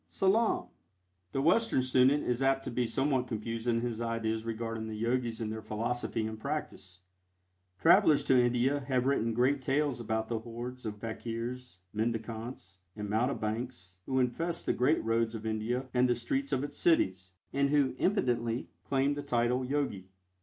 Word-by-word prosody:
SALAAM. 200 - +2 0.7
The 135 - -1
Western 180 - +3
student 130 +3 +4
is 125 +1 -1
apt 135 0 +2
to 130 - -4
be 120 0 0
somewhat 135 0 +1
confused 115 +1 -4
in 115 -1 +2
his 120 -1 -3
ideas 110 -1 -1
regarding 115 -1 -3
the 110 - -5
Yogis 115 +1 -1
and 110 -2 -3
their 110 0 -5
philosophy 110 +1 -2
and 110 0 -5
practice. 110 - -5 0.8
Travelers 145 +8 +6
to 130 -2 +4
India 125 +4 +2
have 130 -2 +1
written 115 -5 +1
great 130 +3 +2
tales 135 -1 0
about 110 -1 -2
the 115 -1 -2
hordes 120 +2 -7
of 105 -1 -5
fakirs, 115 +2 -5 0.2
mendicants 110 -3 -4 0.2
and 105 -1 -5
mountebanks 110 -4 -2
who 130 - 0
infest 165 +7 -1
the - - +2
great 135 +6 +2
roads 115 0 +1
of 110 0 -7
India 110 +4 -1
and 125 0 +3
the 120 - +3
streets 135 +4 -2
of 135 -1 +1
its 145 - -5
cities, 95 - +2 0.2
and 140 0 +2
who 140 -2 +3
impudently 125 - 0 0.2
claim 135 +1 +2
the 145 - -4
title 125 -2 +1
"Yogi." 125 -9 -2
120 Hz, 165 wpm, -31 LUFS, 110-135 Hz, 0.8 s, Travelers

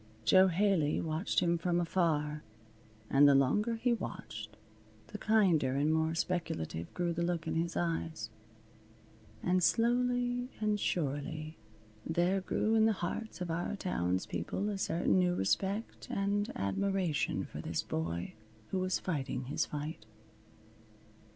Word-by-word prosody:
Jo 185 +11 +7
Haley 180 -4 +2
watched 160 +3 0
him 170 -1 +2
from 175 0 +1
afar, 155 -4 0 0.7
and 140 +4 +6
the 140 - +6
longer 210 - +2
he 240 +2 +1
watched 110 - -6 0.5
the - - -7
kinder 175 -12 +3
and 150 +3 +2
more 160 +1 +1
speculative 85 - -2
grew 175 -1 0
the 170 - -2
look 170 -1 -1
in 160 - -2
his 170 +1 -1
eyes. 165 -8 -2 1.1
And 180 +1 +2
slowly 245 +3 +2
and 210 -1 +1
surely 155 -1 -2 0.4
there 175 +4 +1
grew 215 +3 0
in 220 -1 +5
the 220 - +4
hearts 195 +3 -4
of 175 -2 -2
our 175 +5 -2
townspeople 95 - -2
a 200 -2 -3
certain 175 +1 +2
new 180 -1 +2
respect 195 - -1
and 200 +1 0
admiration 180 - 0
for - - -7
this - - -2
boy 85 +2 -3 0.4
who 190 - 0
was 185 0 +1
fighting 135 -6 -3
his 140 - -1
fight. 150 -6 -6
170 Hz, 135 wpm, -32 LUFS, 150-195 Hz, 1.1 s, Jo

